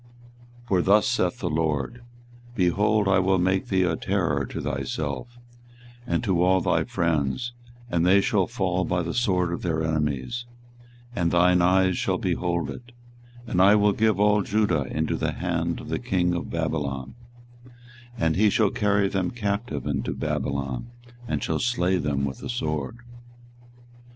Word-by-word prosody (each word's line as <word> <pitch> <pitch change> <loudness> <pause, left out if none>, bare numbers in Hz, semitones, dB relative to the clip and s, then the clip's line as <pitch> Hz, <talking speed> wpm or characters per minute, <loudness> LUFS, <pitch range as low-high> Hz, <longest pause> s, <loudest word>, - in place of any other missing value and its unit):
24:020:004 120 - -24
For 95 -2 +3
thus 100 +3 +4
saith - - 0
the - - -1
LORD, 80 - -1 0.5
Behold, 105 +2 +2
I 95 0 +4
will 95 +1 +2
make 95 +1 +1
thee 95 -1 +2
a 90 -2 +1
terror - - -1
to - - -6
thyself, 120 0 -4 0.7
and 120 - 0
to 95 -6 +1
all 95 +1 +4
thy - - +1
friends: 85 - -1 0.3
and 85 -7 0
they 95 +3 +5
shall 105 -5 +1
fall 95 -6 -1
by 90 -1 -1
the 85 - -3
sword 90 -7 +1
of - - -4
their 80 -3 -1
enemies, 75 - -2 0.7
and 85 -4 +1
thine 90 +1 +4
eyes 95 +1 +3
shall - - 0
behold 85 -3 -1
it: 120 -1 -11 0.5
and 90 -5 +1
I 100 +2 +7
will 105 -1 +3
give 110 -2 +1
all 105 0 +4
Judah 95 -8 +1
into 80 +4 -2
the - - -1
hand - - -2
of - - -9
the - - -1
king 90 -2 0
of 85 - -3
Babylon, 70 -5 -3 1.0
and 80 -5 +1
he 105 +2 +4
shall 105 0 +2
carry 100 -4 +2
them 95 -2 -1
captive 100 - -3
into - - -2
Babylon, 70 - -3 0.4
and - - -2
shall - - -1
slay 95 -7 +1
them 70 -4 -1
with 65 -2 -5
the - - -7
sword. 75 - -3
90 Hz, 160 wpm, -25 LUFS, 80-105 Hz, 1.0 s, I